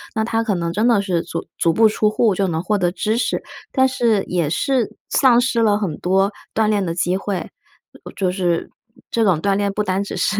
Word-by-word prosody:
那 220 - +1
他 225 0 0
可 220 -3 0
能 170 -1 -2
真 215 +6 +1
的 230 -4 +4
是 180 -4 -1
足 165 0 -5
足 165 - +3
不 225 +3 +5
出 215 0 +1
户 215 0 +2
就 195 +1 0
能 160 -2 -2
获 210 +2 +1
得 175 -1 +1
知 215 +4 -1
识， 245 - -1 0.3
但 260 0 +3
是 230 -6 +1
也 170 -4 -1
是 255 +3 0
丧 250 -3 +4
失 240 -2 0
了 210 -2 +3
很 180 -8 -3
多 195 +3 +2 0.2
锻 220 0 +2
炼 205 -2 +1
的 165 - -2
机 175 +1 0
会。 195 -1 -3 0.7
就 185 -2 0
是 175 -3 -1 0.4
这 230 - +1
种 185 -7 +3
锻 195 +4 +1
炼 200 0 0
不 210 +2 -1
单 190 0 -1
只 200 - -6
是 205 - 0
200 Hz, 240 characters per minute, -20 LUFS, 180-220 Hz, 0.7 s, 不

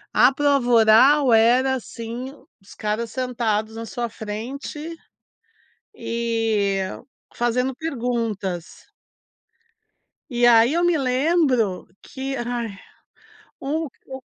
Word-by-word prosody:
A 250 - +6
prova 280 -2 +1
oral 240 +4 +6
era 245 +4 +4
assim, 240 +1 -6 0.3
os 195 - -16
caras 215 +2 -2
sentados 225 -4 -2
na 225 - -5
sua 240 +1 -4
frente 265 +10 -6 1.0
e 225 -4 -1 0.6
fazendo 250 +2 0
perguntas. 230 - -4 1.4
E 240 -2 +1
aí 235 +3 +6
eu 345 +1 +1
me 350 -2 +3
lembro 260 - +1
que 270 0 -5
ai 235 -4 -4 0.8
um 310 +4 -2 0.2
u 265 0 -8
240 Hz, 95 wpm, -22 LUFS, 225-265 Hz, 1.4 s, A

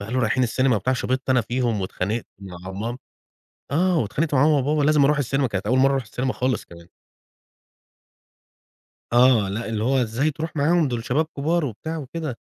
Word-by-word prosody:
فقالوا: 115 +6 -2
"رايحين 125 +3 +1
السينما 125 0 +2
وبتاع." 125 +7 0
شِبطت 130 +1 -2
أنا 125 - +4
فيهم، 120 -2 -1
واتخانقت 100 +4 -3
مع 95 -1 -9
مام 115 +6 -4 0.7
آه. 180 +4 +2
واتخانقت 145 +7 -1
مع 130 - +4
ماما، 155 -1 +4
وبابا، 145 +3 +1
لازم 150 0 +4
أروح 150 +2 +3
السينما 135 0 0
كانت 100 -2 -4
أول 125 +4 +2
مرّة 135 +1 +5
أروح 135 - 0
السينما 125 +3 -3
خالص 130 -2 -1
كمان. 85 0 -14 2.3
آه. 120 -5 +5
لأ، 110 +3 -4
اللي 110 -1 -2
هو 130 +2 +2
إزاي 120 +7 0
تروح 160 +2 -6
معاهم، 160 +2 +2
دول 120 -3 -3
شباب 145 +7 +1
كبار 160 +3 +1
وبتاع 155 +7 -5
وكده. 150 -2 -5
130 Hz, 180 wpm, -23 LUFS, 110-145 Hz, 2.3 s, مرّة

